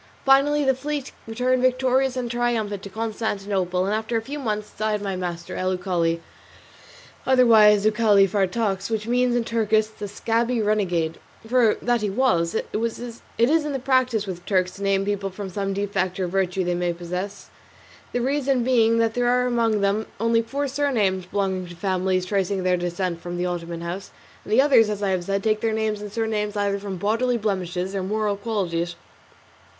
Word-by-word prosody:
Finally 280 +2 +4
the 265 -1 +3
fleet 285 +1 -4 0.2
returned 250 +3 +1
victorious 255 0 +2
and 245 -2 -2
triumphant 230 -5 -1
to 200 - -8
Constantinople, 200 -4 -2
and 200 - 0 0.2
a 230 - +2
few 285 +6 -6
months 210 -5 -3
later 215 0 0
died 210 - -4
my 195 -2 -2
master, 175 -2 -5
El 185 0 -1
Uchali, 170 -3 0 1.1
otherwise 220 -5 +6
Uchali 210 -2 +4
Fartax, 195 +1 0
which 220 -2 -2
means 245 +1 +2
in 240 - +1
Turkish 220 -2 +2
"the 215 -1 -8
scabby 230 +4 0
renegade;" 180 -7 0 0.3
for 240 -2 +4
that 240 -1 +1
he 210 - 0
was; 190 -7 +1
it - - -1
is 230 +1 -3 0.4
the 280 -3 -3
practice 255 -5 +2
with 190 -3 -5
the - - -18
Turks 185 -2 +2
to 200 - -12
name 195 0 +1
people 200 -1 -1
from 190 0 -7
some 195 +1 -2
defect 195 -2 -1
or 185 - 0
virtue 185 0 0
they 175 0 0
may 175 0 0
possess; 180 +4 -6 0.6
the 245 - -1
reason 270 -1 +1
being 230 -2 +3
that 225 -1 +2
there 245 0 +1
are 250 0 +3
among 230 -4 +1
them 200 +2 +1
only 230 +1 +3
four 275 +5 -3
surnames 225 -10 0
belonging 190 -2 -1
to 175 - -10
families 185 0 0
tracing 195 0 -1
their 180 0 +3
descent 175 0 -2
from 175 +1 -5
the 175 - -1
Ottoman 170 -1 -4
house, 175 +3 -5 0.3
and - - -10
the 250 +5 +6
others, 245 -7 +5
as 205 -1 -3
I 200 - +1
have 180 -2 -1
said, 195 +1 -1
take 215 -1 +1
their 225 -1 0
names 215 -1 -1
and 210 -1 -7
surnames 215 -2 -2
either 200 -1 0
from 195 -2 -5
bodily 230 +6 +1
blemishes 185 -3 -2
or 195 - -1
moral 210 +2 -1
qualities. 180 -5 -2
210 Hz, 185 wpm, -23 LUFS, 185-235 Hz, 1.1 s, otherwise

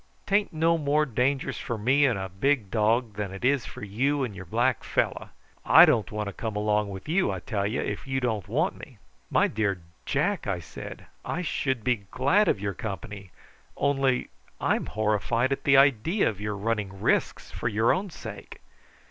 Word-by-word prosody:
"'Tain't 205 +1 +1
no 165 +1 +2
more 150 +1 +2
dangerous 130 +2 -1
for 115 - -4
me 135 +7 +3
and 120 -6 0
a 95 0 -3
big 105 +2 0
dog 115 +1 +1
than 105 -2 -3
it 95 +5 -5
is 135 -1 +2
for - - -9
you 135 +8 0
and 115 -6 -4
your 95 0 -8
black 120 +7 0
fellow. - - -1 0.3
I - - +9
don't 110 - +1
want 105 0 -3
to 100 - -5
come 110 -2 -4
along 105 0 +1
with 95 +4 -8
you, 175 - +2
I 95 - -4
tell 100 -1 -2
you, 110 - -1
if - - -4
you 130 0 0
don't 110 -6 -2
want 155 - 0
me." 130 -7 -12 0.3
"My - - +3
dear 100 -3 -1 0.3
Jack," 175 - 0
I 100 -3 0
said, 85 - -9 0.2
"I 180 - -3
should 130 -7 -1
be 120 -6 0
glad 180 +12 +3
of - - +2
your 100 0 -2
company, 100 -1 -6 0.5
only 135 -2 +1 0.3
I'm - - 0
horrified 110 +4 0
at 135 - -2
the 140 -1 +6
idea 140 - +4
of 105 -2 -3
your 105 -1 -3
running 105 -2 -2
risks - - 0
for - - -3
your 110 +1 +3
own 190 +2 -2
sake. 155 - -9
115 Hz, 190 wpm, -27 LUFS, 105-140 Hz, 0.5 s, I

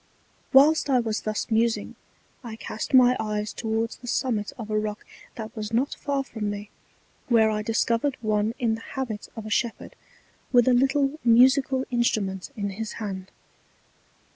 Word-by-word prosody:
Whilst 290 +3 +5
I 260 -2 +4
was 220 -2 -2
thus 215 +2 -3
musing, 225 +1 +1 0.5
I 230 -2 -7
cast 220 -1 -6
my 250 -1 +7
eyes 210 -1 -2
towards 225 0 -2
the 245 - -12
Summit 225 -4 -1
of 220 -3 -7
a 215 - +2
Rock 215 0 -4 0.3
that 220 -1 -7
was 215 -1 -5
not 245 +5 +1
far 280 -1 -2
from 220 -6 -4
me, 205 0 -6 0.6
where 225 -3 +4
I 215 0 -1
discovered 230 +5 0
one 215 0 0
in 230 -3 +1
the 225 - -5
Habit 235 -5 -5
of 225 -2 -7
a 215 - -7
Shepherd, 235 +1 -2 0.6
with 245 -1 +5
a 255 - +5
little 275 +3 +2
Musical 260 +3 +4
Instrument 210 -5 0
in 200 -3 -3
his 220 +3 -5
Hand. 190 -4 -6
225 Hz, 165 wpm, -25 LUFS, 215-255 Hz, 0.6 s, my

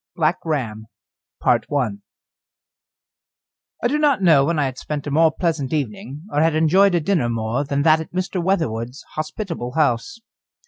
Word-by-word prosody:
BLACK 160 +1 +1
RAM 115 -9 -3 0.6
I - - +5 2.3
do 295 +4 0
not 285 -9 +2
know 155 -6 +6
when 170 +3 0
I 145 - +2
had 130 -1 -4
spent 150 -2 -5
a 145 - -4
more 160 +2 +4
pleasant 160 -7 -2
evening, 140 +1 -4
or 145 - +1
had 160 -1 +2
enjoyed 180 +5 +4
a - - +3
dinner 165 -7 0
more 115 +3 -1
than 140 0 -1
that 155 0 +5
at 160 - -10
Mr. 185 0 -2
Weatherwood's 135 - -1
hospitable 155 - -4
house. 155 - 0
155 Hz, 150 wpm, -21 LUFS, 135-170 Hz, 2.3 s, know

